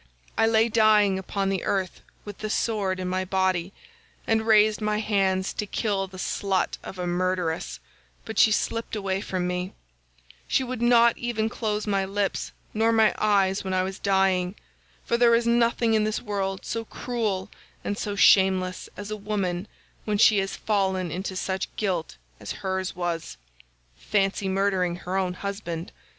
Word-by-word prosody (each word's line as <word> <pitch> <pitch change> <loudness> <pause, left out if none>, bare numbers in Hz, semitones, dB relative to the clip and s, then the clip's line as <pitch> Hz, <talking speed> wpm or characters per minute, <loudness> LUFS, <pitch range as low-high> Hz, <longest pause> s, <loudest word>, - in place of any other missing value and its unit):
I 225 - +3
lay 225 0 +4
dying 210 -3 +4
upon 195 +1 -2
the 195 -2 -1
earth 190 -2 -2 0.2
with 205 -2 -8
the 215 - -4
sword 205 -4 0
in 185 - -3
my 185 +1 -1
body, 185 -1 0 0.5
and 220 0 +1
raised 215 0 +5
my 210 0 0
hands 195 -3 +1
to 210 - -3
kill 200 -2 -1
the 185 0 -12
slut 190 +1 -1
of 190 - -9
a 180 - -3
murderess, 175 -2 -1 0.5
but 220 - -3
she 220 - +6
slipped 230 +2 -1
away 195 -2 -2
from 185 -3 -2
me; 180 +1 -3 0.7
she 265 - +2
would 255 -2 -5
not 235 -1 +5
even 225 -2 -1
close 215 -2 -2
my 200 -2 +1
lips 195 +1 -2 0.2
nor 225 +1 +2
my 220 -1 +4
eyes 200 -2 +2
when 190 -1 -2
I 185 - +2
was 190 +1 -5
dying, 190 -1 +1 0.5
for 235 - +1
there 235 -1 +5
is 230 0 +1
nothing 235 -1 +2
in 215 -1 +3
this 215 0 -1
world 195 -3 -3
so 230 - -3
cruel 215 -6 -3 0.3
and 205 - -2
so 205 0 -3
shameless 190 -2 +4
as 205 +1 -6
a - - -1
woman 200 -3 -2 0.4
when 210 -1 0
she 210 -1 +6
has 195 0 -2
fallen 190 -4 0
into 190 +1 -4
such 190 0 -2
guilt 180 - -2 0.2
as - - -6
hers 190 0 -2
was. 175 -2 -3 0.6
Fancy 195 -1 0
murdering 190 -2 +1
her 180 +1 -5
own 185 -2 0
husband! 185 -4 -5
195 Hz, 165 wpm, -25 LUFS, 185-215 Hz, 0.7 s, she